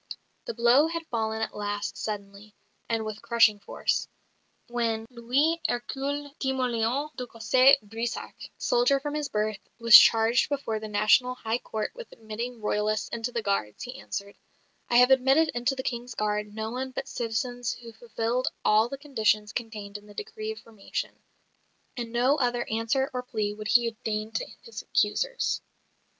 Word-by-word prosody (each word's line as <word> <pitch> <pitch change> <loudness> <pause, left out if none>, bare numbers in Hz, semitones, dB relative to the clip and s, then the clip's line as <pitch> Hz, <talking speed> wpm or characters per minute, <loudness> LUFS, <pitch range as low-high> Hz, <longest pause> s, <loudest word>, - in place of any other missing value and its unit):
The - - -5
blow 240 +6 +5
had 335 0 -4
fallen 220 -1 -1
at - - -4
last, 205 0 -3
suddenly, 205 0 -6 0.3
and 225 -1 0
with 215 -1 -6
crushing 230 -3 +4
force. - - -1 0.6
When 230 -2 -1
"Louis 270 +8 +1
Hercule 275 +4 -3
Timoleon 255 +1 0
de 250 -1 -5
Cossé 255 +4 +5
Brissac, 225 +3 -4 0.2
soldier 245 +3 +3
from 295 +1 -4
his 300 -2 -2
birth," 215 -3 -1 0.2
was 230 -2 +7
charged 225 +2 +7
before 275 -7 -2
the 215 - -6
National 215 +5 +3
High 230 -1 -2
Court 215 -3 -4
with - - -10
admitting 230 +2 -6
Royalists 210 +1 0
into 235 +1 -3
the 235 -2 -2
Guards, 195 - -1
he 255 +2 -7
answered: 200 0 -6 0.5
"I - - +1
have 250 +2 +7
admitted 270 +4 +5
into 245 +2 0
the 260 - -4
King's 240 -1 -4
Guards 210 0 -1
no 220 +1 -4
one 260 +2 -3
but 260 - -5
citizens 245 +1 -2
who 230 -1 -11
fulfilled 230 +2 -2 0.2
all 215 +2 +4
the 275 - -5
conditions 220 -7 0
contained 210 -3 -5
in 205 - -19
the 205 - -14
decree 435 0 -5
of 440 - -7
formation": 220 -3 -6 0.7
and 235 -3 -5
no 250 +5 +3
other 245 -2 0
answer 230 +5 0
or 250 - -2
plea 215 -4 -2
would 215 0 -7
he 235 -1 +4
deign 215 0 -2
to 225 - -3 0.2
his 460 - -8
accusers. - - 0
235 Hz, 165 wpm, -27 LUFS, 215-255 Hz, 0.7 s, was